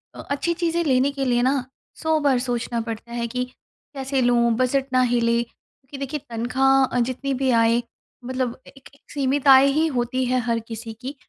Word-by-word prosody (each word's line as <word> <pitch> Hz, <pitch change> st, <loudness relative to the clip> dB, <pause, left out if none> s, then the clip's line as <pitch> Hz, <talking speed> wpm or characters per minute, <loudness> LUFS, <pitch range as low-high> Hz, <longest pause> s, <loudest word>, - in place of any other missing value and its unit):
अ -, -, -11 dB
अच्छी 340 Hz, +4 st, 0 dB
चीज़ें 340 Hz, 0 st, -1 dB
लेने 265 Hz, -1 st, +2 dB
के 275 Hz, -1 st, -3 dB
लिए 245 Hz, -1 st, +2 dB
ना 260 Hz, +2 st, +3 dB, 0.5 s
100 315 Hz, -1 st, +2 dB
बार 265 Hz, -3 st, +3 dB
सोचना 240 Hz, -1 st, -2 dB
पड़ता 225 Hz, 0 st, -7 dB
है 235 Hz, -1 st, -2 dB
कि 250 Hz, +2 st, -2 dB, 0.5 s
कैसे 270 Hz, 0 st, -1 dB
लूँ, 240 Hz, -1 st, +3 dB
बजट 260 Hz, +2 st, +1 dB
ना 255 Hz, -, +4 dB
हिले 235 Hz, -1 st, +2 dB
क्योंकि 265 Hz, +3 st, -16 dB
देखिए 275 Hz, +2 st, -4 dB
तनख़्वाह 260 Hz, +2 st, +2 dB
जितनी 275 Hz, +2 st, -3 dB
भी 265 Hz, -, +2 dB
आए 230 Hz, +1 st, +3 dB, 0.4 s
मतलब 255 Hz, -1 st, -2 dB
अ, -, -, -19 dB
एक -, -, -15 dB
एक 280 Hz, -, -22 dB
सीमित 280 Hz, 0 st, -1 dB
आय 265 Hz, 0 st, +8 dB
ही 320 Hz, -, +3 dB
होती 245 Hz, +2 st, 0 dB
है 255 Hz, +1 st, +1 dB
हर 230 Hz, 0 st, +1 dB
किसी 225 Hz, 0 st, -7 dB
की 265 Hz, +3 st, -6 dB
255 Hz, 190 wpm, -23 LUFS, 240-275 Hz, 0.5 s, आय